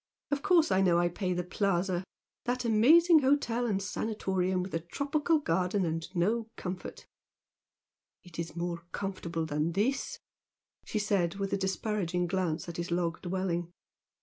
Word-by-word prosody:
Of 285 Hz, -1 st, 0 dB
course 340 Hz, -, +4 dB
I 190 Hz, 0 st, +4 dB
know 180 Hz, -3 st, +4 dB
I 175 Hz, 0 st, +3 dB
pay 185 Hz, +1 st, -2 dB
the 180 Hz, 0 st, -1 dB
Plaza! 180 Hz, -1 st, 0 dB, 0.4 s
that 245 Hz, 0 st, -1 dB
amazing 315 Hz, +10 st, +6 dB
hotel 260 Hz, -4 st, +2 dB
and 200 Hz, -4 st, +1 dB
'sanatorium' 190 Hz, -2 st, -1 dB
with 185 Hz, -, -7 dB
a 165 Hz, -, +1 dB
tropical 290 Hz, -, 0 dB
garden 185 Hz, -, 0 dB
and 165 Hz, 0 st, -2 dB
no 215 Hz, +6 st, +1 dB
comfort 180 Hz, 0 st, -6 dB, 0.6 s
" -, -, -63 dB
"It 175 Hz, -2 st, -11 dB
is 165 Hz, -1 st, -4 dB
more 170 Hz, 0 st, -2 dB
comfortable 175 Hz, -4 st, -3 dB
than 155 Hz, +2 st, -1 dB
this" 270 Hz, -, 0 dB, 0.7 s
she -, -, -3 dB
said, 200 Hz, -5 st, +1 dB
with 195 Hz, -1 st, -3 dB
a -, -, +3 dB
disparaging 190 Hz, -2 st, -1 dB
glance 175 Hz, -3 st, -1 dB
at 170 Hz, -, -6 dB
his 170 Hz, +1 st, -3 dB
log 170 Hz, -1 st, -1 dB
dwelling. 175 Hz, -2 st, -2 dB
190 Hz, 155 wpm, -30 LUFS, 175-220 Hz, 0.7 s, amazing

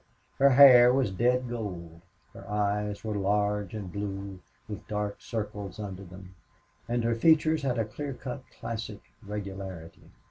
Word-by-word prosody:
Her 140 Hz, 0 st, +7 dB
hair 125 Hz, -2 st, +9 dB
was 130 Hz, -5 st, +1 dB
dead 125 Hz, +5 st, +1 dB
gold; 90 Hz, -8 st, -6 dB, 0.3 s
her -, -, -12 dB
eyes 105 Hz, 0 st, -1 dB
were 110 Hz, -1 st, -2 dB
large 105 Hz, 0 st, 0 dB
and 100 Hz, -5 st, -6 dB
blue, 100 Hz, -1 st, -5 dB, 0.3 s
with 105 Hz, -, -8 dB
dark 105 Hz, -1 st, -3 dB
circles 105 Hz, -3 st, -5 dB
under 100 Hz, -2 st, -6 dB
them; 95 Hz, 0 st, -12 dB, 0.6 s
and 120 Hz, 0 st, 0 dB
her 115 Hz, 0 st, +2 dB
features 155 Hz, +5 st, +4 dB
had 130 Hz, -3 st, -1 dB
a 115 Hz, -, +1 dB
clear 140 Hz, +6 st, -6 dB
cut 130 Hz, +1 st, -6 dB
classic 110 Hz, -3 st, -6 dB, 0.2 s
regularity. 95 Hz, -5 st, -7 dB
105 Hz, 145 wpm, -28 LUFS, 100-120 Hz, 0.6 s, hair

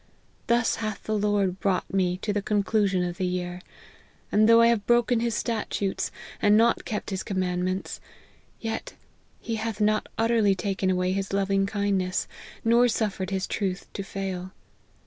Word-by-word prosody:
Thus 235 Hz, -1 st, +2 dB
hath 215 Hz, -3 st, -4 dB
the 215 Hz, -, -1 dB
Lord 205 Hz, -3 st, +1 dB
brought 190 Hz, -2 st, -1 dB
me 180 Hz, -2 st, +1 dB
to 210 Hz, -, 0 dB
the 205 Hz, -, 0 dB
conclusion 200 Hz, -2 st, +1 dB
of 175 Hz, -1 st, -3 dB
the 185 Hz, -1 st, 0 dB
year; 180 Hz, 0 st, -3 dB, 0.7 s
and 215 Hz, +2 st, +4 dB
though 230 Hz, 0 st, +8 dB
I 230 Hz, -, +7 dB
have 230 Hz, -3 st, +2 dB
broken 240 Hz, 0 st, +3 dB
his 230 Hz, -1 st, 0 dB
statutes, 210 Hz, -4 st, -2 dB, 0.3 s
and 210 Hz, 0 st, +5 dB
not 230 Hz, +1 st, +3 dB
kept 210 Hz, -1 st, -4 dB
his 190 Hz, -, -2 dB
command 180 Hz, -2 st, -1 dB
ments, 185 Hz, +1 st, -3 dB, 0.6 s
yet 225 Hz, -1 st, -4 dB, 0.4 s
he 225 Hz, -1 st, -3 dB
hath 220 Hz, -1 st, -3 dB
not 215 Hz, 0 st, +1 dB
utterly 225 Hz, -3 st, +3 dB
taken 195 Hz, 0 st, -1 dB
away 180 Hz, 0 st, +1 dB
his 195 Hz, 0 st, -2 dB
loving 195 Hz, 0 st, +1 dB
kindness, 200 Hz, -3 st, 0 dB, 0.4 s
nor 235 Hz, +2 st, +5 dB
suffered 205 Hz, -5 st, -1 dB
his 190 Hz, -1 st, -1 dB
truth 190 Hz, -2 st, -2 dB
to -, -, -4 dB
fail. 190 Hz, -1 st, -5 dB
200 Hz, 165 wpm, -26 LUFS, 185-220 Hz, 0.7 s, though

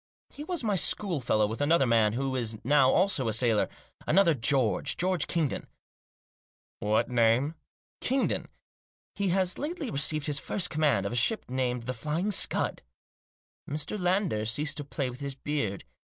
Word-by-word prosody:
" -, -, -73 dB
He 295 Hz, -, -7 dB
was 340 Hz, -3 st, -3 dB
my 210 Hz, -3 st, +1 dB
schoolfellow, 145 Hz, -, +1 dB
with 110 Hz, +5 st, -4 dB
another 145 Hz, -1 st, +4 dB
man 115 Hz, -3 st, +3 dB
who 135 Hz, +2 st, -2 dB
is 115 Hz, -3 st, -2 dB
now 140 Hz, -1 st, +5 dB
also 180 Hz, -7 st, +2 dB
a 110 Hz, -, 0 dB
sailor 110 Hz, -1 st, +2 dB, 0.2 s
— -, -, -25 dB
another 170 Hz, 0 st, +5 dB
George; 130 Hz, -3 st, +1 dB
George 180 Hz, -2 st, 0 dB
Kingdon." 160 Hz, -6 st, -1 dB, 0.6 s
" -, -, -87 dB
What 105 Hz, +1 st, +1 dB
name? 120 Hz, +4 st, +2 dB, 0.2 s
" -, -, -81 dB
" -, -, -73 dB
Kingdon. 265 Hz, +1 st, 0 dB, 0.7 s
He 200 Hz, -1 st, -1 dB
has 185 Hz, 0 st, 0 dB
lately 300 Hz, -2 st, -4 dB
received 150 Hz, +1 st, 0 dB
his 150 Hz, -2 st, 0 dB
first 180 Hz, +3 st, -2 dB
command; 145 Hz, -10 st, +2 dB
of 100 Hz, -, -3 dB
a -, -, -2 dB
ship 130 Hz, -, +1 dB
named 125 Hz, -1 st, -1 dB
The 125 Hz, +2 st, -3 dB
Flying 155 Hz, -, -2 dB
Scud" -, -, +1 dB, 0.9 s
Mr. 150 Hz, +7 st, -3 dB
Lander 180 Hz, -, +1 dB
ceased 140 Hz, +7 st, -1 dB
to 145 Hz, -, -3 dB
play 135 Hz, 0 st, -3 dB
with 125 Hz, +1 st, -7 dB
his 140 Hz, -1 st, -4 dB
beard. 130 Hz, -8 st, -3 dB
140 Hz, 175 wpm, -28 LUFS, 120-180 Hz, 0.9 s, now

